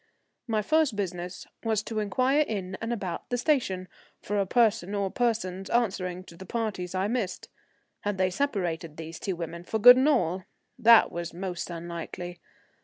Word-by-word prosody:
My 215 -2 0
first 310 -1 +2
business 180 -2 -4 0.2
was 220 -2 +1
to 220 -1 -3
inquire 255 +8 +2
in 195 -10 -1
and 225 +1 -2
about 190 -7 -4
the 245 - 0
station 235 -9 +1 0.3
for 205 0 -2
a 195 - +1
person 215 -4 +2
or 200 -2 -1
persons 195 -6 -1
answering 185 -6 0
to 170 - -14
the 190 - -10
parties 190 -4 -3
I 190 +2 +1
missed. 215 -5 -3 0.5
Had 205 -1 -2
they 185 0 +2
separated, 180 - -2
these 160 0 -7
two 190 - -2
women, 170 0 -6
for 220 - -2
good 245 +3 +10
and 265 +4 +4
all? 185 - +1 0.3
That 230 -1 +7
was 170 -1 -5
most 180 -1 -4
unlikely. 170 +1 -6
195 Hz, 170 wpm, -28 LUFS, 180-230 Hz, 0.5 s, good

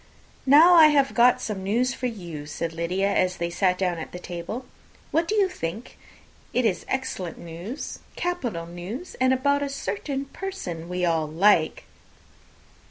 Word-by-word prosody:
"Now 315 +6 +8
I 325 -3 +9
have 280 -3 +3
got 245 +1 +5
some 205 -3 -3
news 235 +7 +1
for 250 - -2
you," 170 -10 -7
said 165 +2 -4
Lydia, 180 +4 0
as 185 -1 +1
they 170 0 -2
sat 180 +1 +2
down 180 -2 0
to 165 +2 -7
table. 180 +8 -6 0.5
"What 330 +1 +1
do 430 - 0
you 405 -2 +4
think? 215 - -6 0.6
It 250 0 +2
is 195 -5 0
excellent 260 -10 -3
news, 175 - -7 0.2
capital 245 - -2
news, 180 - -7
and 260 0 +4
about 280 +2 +2
a 285 - -1
certain 275 +3 -3
person 275 - -6
that 165 - -9
we 180 0 -1
all 165 -2 +1
like." 165 +1 +3
200 Hz, 165 wpm, -25 LUFS, 170-270 Hz, 0.6 s, I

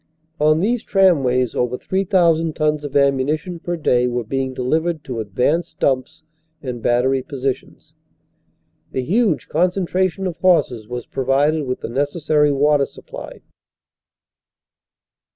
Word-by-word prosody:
On 155 +2 +3
these 235 +4 +1
tramways 135 - +2
over 125 0 -1
3,000 175 -4 +1
tons 150 -1 0
of 145 -2 -7
ammunition 140 +5 +1
per 175 0 -3
day 125 -5 +2
were 120 0 -2
being 130 +3 -2
delivered 155 +5 -1
to 125 -3 -5
advanced 125 - -1
dumps 130 +2 -1 0.4
and 125 -5 -6
battery 125 +3 +2
positions. 135 0 -5 1.0
The 130 - -1
huge 195 - +1
concentration 185 +2 0
of 175 -2 -3
horses 145 - +2
was 125 +1 -5
provided 140 +3 0
with 125 - -3
the - - -5
necessary 145 +3 +1
water 145 0 +2
supply. - - -11
145 Hz, 120 wpm, -20 LUFS, 130-170 Hz, 1.0 s, On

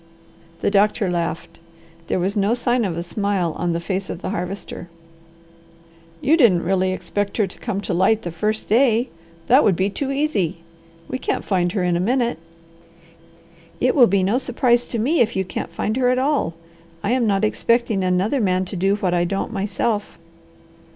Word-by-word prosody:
The - - +1
doctor 205 -1 +2
laughed. 170 -1 -3 0.5
There - - 0
was 190 +3 -1
no 205 +3 +2
sign 240 -1 +1
of 170 -4 -3
a 170 - -2
smile 190 -2 -1
on 175 0 -1
the 170 - -1
face 190 +3 -3
of 170 - -6
the - - -2
Harvester. 180 -1 -5 1.3
"You 295 +4 +4
didn't 200 - +4
really 185 +1 +1
expect 190 +2 -3
her 215 - +3
to 190 - -11
come 205 -4 -3
to 195 - -3
light 200 +5 +2
the 175 - -4
first 215 +6 -2
day? 240 +1 +3 0.4
That 260 +4 +5
would 195 - +3
be 190 +3 0
too 270 +6 -3
easy! 270 - 0 0.5
We 255 - -4
can't - - -2
find 180 -3 0
her 195 - 0
in 175 -1 +1
a - - 0
minute." 240 +2 0 1.4
"It - - +2
will 250 -5 +6
be 195 0 +2
no 210 +7 +2
surprise 245 -1 +1
to 235 - -4
me 275 +10 +1
if 230 -1 +2
you 190 0 0
can't - - -5
find 215 - -2
her 250 -1 +3
at 255 - +2
all. 265 - 0 0.5
I 205 - 0
am 245 -2 +2
not 200 0 +2
expecting 230 -2 +1
another 185 +8 +1
man 185 -2 +1
to 190 - -7
do 195 +3 +2
what 190 -4 -1
I 175 -1 +2
don't 195 +3 -2
myself." 205 -1 -2
200 Hz, 190 wpm, -21 LUFS, 180-235 Hz, 1.4 s, will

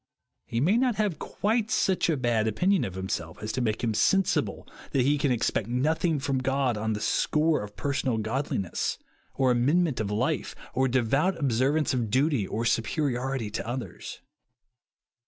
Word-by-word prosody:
He 115 - -2
may 180 - +3
not 250 -2 +2
have 205 -6 -1
quite 220 +1 -1
»ucli 185 -5 +1
a - - +2
haj 110 -2 +2
opinion 180 - +2
of 95 - -6
himself 90 -3 -4
as 110 - -2
to 130 - -2
make 110 -1 -1
him 115 -2 +1
sensible 195 - +1 0.3
that 130 -3 +3
iie 145 +1 +2
can 140 -1 +1
expect 115 -3 0
nothing 155 +6 +1
from 135 -1 -1
God 135 -2 0
on 110 +1 -1
the 105 - -3
score 155 +7 +1
of 105 0 -8
personal 140 -4 -1
goodness, 110 -4 -2 0.4
or 130 -2 +3
amend 135 +9 +3
ment 150 -7 -2
of 105 -2 -1
life, 105 +1 -1 0.2
or 130 +1 +2
devout 135 +9 +1
observance 140 +2 +1
of 120 -4 -1
duty, 130 -3 +1
or 115 +2 -2
superiority 125 -1 -1
to 110 - -4
others. 125 +1 -6
130 Hz, 170 wpm, -27 LUFS, 110-150 Hz, 0.4 s, may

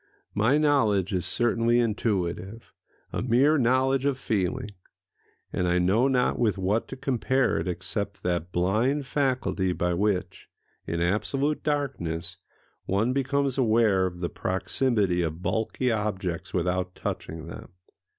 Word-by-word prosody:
My 115 +8 +3
knowledge 110 - +2
is 90 -2 0
certainly 120 0 +2
intuitive—a 105 -2 -3
mere 130 +6 +3
knowledge 130 +2 +2
of 140 -2 +1
feeling; 105 -4 -1 0.8
and 90 - 0
I 90 0 +2
know 100 +8 +3
not 130 -2 +1
with 110 -4 +2
what 100 +4 0
to - - -7
compare 130 0 +1
it 85 - -3
except 95 +3 -3
that 85 -1 -1
blind 110 +12 +1
faculty 125 -10 0
by 90 0 0
which, 95 0 -1 0.4
in 85 +1 -2
absolute 135 +11 0
darkness, 95 - -2 0.5
one 110 +6 +1
becomes 135 0 0
aware 110 -6 +3
of 90 -1 -8
the 85 - -1
proximity 95 -1 0
of 80 +1 -3
bulky 115 +3 0
objects 95 -6 -2
without 90 +1 -1
touching 80 -1 -5
them. 85 - -9
105 Hz, 130 wpm, -26 LUFS, 90-130 Hz, 0.8 s, My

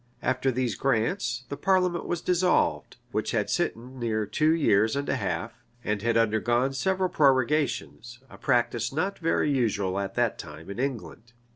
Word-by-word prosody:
After 130 +1 +1
these 125 -2 -1
grants, 120 +1 0
the - - -3
parliament 180 +1 +1
was 175 - -2
dissolved, 180 0 +1
which - - -1
had - - 0
sitten 125 +3 -2
near 110 -2 -1
two 155 +9 +2
years 110 -9 +3
and 140 0 -2
a - - +1
half, 95 -8 -3 0.3
and 105 -1 -1
had 115 +1 +1
undergone 120 +4 +2
several 190 +6 0
prorogations; 135 -5 +1
a - - -14
practice 120 -3 +1
not 185 +8 -2
very 160 -3 +1
usual 100 -7 0
at 100 -1 -4
that 120 -2 0
time 80 +5 -9
in 100 - -7
England. 120 -3 -4
125 Hz, 160 wpm, -27 LUFS, 110-145 Hz, 0.3 s, years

